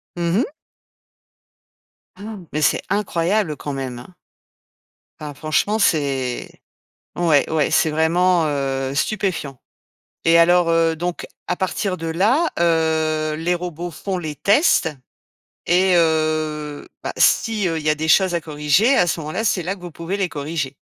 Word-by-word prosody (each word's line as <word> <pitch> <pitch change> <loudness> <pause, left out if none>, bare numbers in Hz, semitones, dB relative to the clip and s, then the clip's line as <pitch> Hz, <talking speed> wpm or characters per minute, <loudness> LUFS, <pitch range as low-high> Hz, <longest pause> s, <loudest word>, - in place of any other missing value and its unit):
Mmh 170 +2 0
mh. 270 - -2 1.6
Ah! 210 +3 -8
Mais 155 - -2
c'est - - +2
incroyable 185 -3 0
quand 145 - -5
même, 130 -3 -5
hein! 125 - -13 1.1
Ah, 150 -1 -7
franchement 155 +8 0
c'est 135 - 0 0.7
ouais, 160 -5 +2
ouais, 155 -2 +1
c'est 160 - +3
vraiment, 165 +2 +2
heu, 135 -2 -2
stupéfiant 180 - -2 0.7
et 165 +1 +5
alors, 175 0 +4
heu, 165 -1 +2
donc, 175 +1 -4 0.2
à 180 - -1
partir 190 0 -2
de 165 - -6
là, 220 - +2
heu, 160 -2 +1
les 170 +3 0
robots 175 0 -5
font 185 +4 -4
les 155 -3 -5
tests 200 - +3 0.8
et 185 +1 +3
heu, 155 -2 0 0.2
bah, - - -3
si, 215 -4 +2
heu, 165 - -1
il 155 - -5
y - - +3
a 155 - +2
des 160 +1 -3
choses 185 +2 +4
à 170 - -1
corriger, 155 - +2
à 175 - +3
ce 165 - -1
moment-là, 155 +8 -4
c'est 190 -4 +1
là 185 +4 -2
que 185 - -18
vous 175 -1 -8
pouvez 170 +6 -4
les 190 -3 -1
corriger? 145 -2 -4
165 Hz, 155 wpm, -20 LUFS, 155-180 Hz, 1.6 s, et